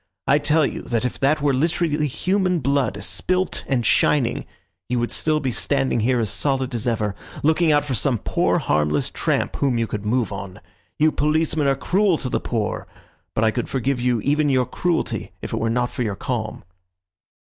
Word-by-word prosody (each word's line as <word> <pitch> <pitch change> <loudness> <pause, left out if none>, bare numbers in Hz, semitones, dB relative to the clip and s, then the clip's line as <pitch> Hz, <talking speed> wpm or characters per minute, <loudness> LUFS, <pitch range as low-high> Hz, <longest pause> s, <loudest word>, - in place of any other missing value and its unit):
I 145 - +4
tell 150 +1 +3
you - - -4
that 120 0 -1
if 125 - -3
that 145 +2 +2
were 145 -2 +3
literally 155 +1 +1
human 185 +5 0
blood, 135 -7 0
spilt 185 - -1
and 125 -4 0
shining, 125 0 +2 0.4
you 125 - 0
would 120 0 -1
still 155 -1 +1
be 135 -3 -1
standing 135 0 0
here 125 +3 +2
as 110 -4 0
solid 135 -2 0
as 120 0 -2
ever, 110 -3 0 0.3
looking 160 +2 +3
out 145 -1 +3
for 140 - -2
some 125 +1 +1
poor - - +1
harmless 75 0 +1
tramp - - -1
whom 135 -4 +1
you 115 - +1
could 105 -2 -5
move 115 +2 0
on. 100 0 -7 0.4
You 155 +1 +4
policemen 155 0 +1
are 135 - +3
cruel 190 +3 +2
to 130 - -3
the - - 0
poor, 110 -3 -2 0.5
but 110 - +1
I 110 - +4
could 120 +1 -3
forgive 135 0 -1
you 125 -2 +1
even 145 +3 +2
your 130 -2 +3
cruelty 170 +7 -2
if - - -6
it - - 0
were 115 - 0
not 120 +1 0
for - - -5
your 105 -4 -1
calm." 110 -3 -4
130 Hz, 195 wpm, -22 LUFS, 115-150 Hz, 0.5 s, I